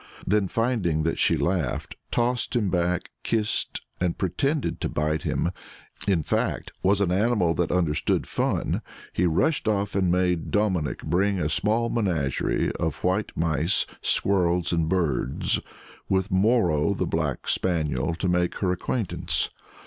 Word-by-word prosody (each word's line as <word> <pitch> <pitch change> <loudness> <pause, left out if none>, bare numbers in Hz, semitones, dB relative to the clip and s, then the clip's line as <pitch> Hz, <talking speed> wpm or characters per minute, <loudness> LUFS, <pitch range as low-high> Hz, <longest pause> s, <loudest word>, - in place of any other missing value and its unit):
Then 100 0 +2
finding 105 -9 0
that 80 - -1
she - - +3
laughed, 85 -9 -1
tossed 120 0 0
him 105 -6 +1
back, 90 -1 0
kissed, 110 -2 -1 0.2
and 90 -2 0
pretended 135 - -1
to - - -1
bite 75 +1 -1
him 85 - -1 0.6
in 90 -6 +2
fact, - - -1
was 100 +1 +3
an 95 -3 +2
animal 100 -3 +2
that 85 0 0
understood 85 -4 +1
fun - - -1 0.3
he 90 - +2
rushed 110 - +1
off 100 -1 0
and 95 -3 +2
made 90 -2 +1
Dominic 95 -8 0
bring 95 +5 +1
a 75 -4 0
small 110 +7 +2
menagerie 85 - 0
of 80 -4 -2
white 95 +4 0
mice, 80 +3 +2 0.2
squirrels, 90 -3 +2
and 80 -2 +1
birds, 80 -8 0 0.5
with 95 +1 +1
Moro, 95 -4 +3
the 90 - -1
black 80 -5 -2
spaniel, 80 -4 +1
to 90 - -2
make 90 0 +1
her 95 -3 0
acquaintance. 100 +3 -1
90 Hz, 140 wpm, -25 LUFS, 80-100 Hz, 0.6 s, she